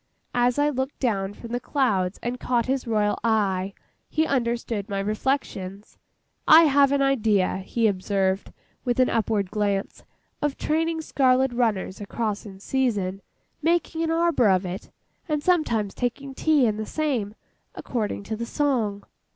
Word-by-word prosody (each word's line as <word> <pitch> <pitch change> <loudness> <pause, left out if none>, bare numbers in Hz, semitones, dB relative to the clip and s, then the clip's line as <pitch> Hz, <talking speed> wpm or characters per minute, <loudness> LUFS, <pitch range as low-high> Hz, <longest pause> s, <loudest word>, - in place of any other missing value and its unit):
As 245 +1 +2
I 290 +1 +3
looked 265 +1 -3
down 200 -5 -1
from 235 - -10
the 245 - -1
clouds 210 -9 0
and 245 +1 -3
caught 240 -2 0
his 260 -1 -1
royal 210 -2 +1
eye, 200 -4 +1 0.3
he 315 0 +1
understood 235 -5 -1
my 200 - -2
reflections. 205 -2 -3 0.5
'I 320 +2 +9
have 280 -2 +4
an 280 -1 +2
idea,' 220 -9 +2
he 225 +4 -1
observed, 195 -1 0 0.3
with 245 -1 0
an 255 - +4
upward 215 -4 0
glance, 205 -2 -1 0.4
'of 290 -2 -1
training 325 +1 0
scarlet 260 -3 +2
runners 215 -5 -1
across 210 0 -3
in 195 - -10
the - - -15
season,—making 265 - -1
a - - +1
arbour 330 -9 +3
of 185 0 +2
it,—and 290 - -6
sometimes 235 - +1
taking 265 +3 -3
tea 300 -1 +3
in 215 -2 +1
the 215 - -3
same, 250 -10 -1 0.4
according 215 -4 -3
to 220 +2 -4
the 235 +2 -5
song. 230 -10 0
235 Hz, 150 wpm, -25 LUFS, 205-275 Hz, 0.5 s, I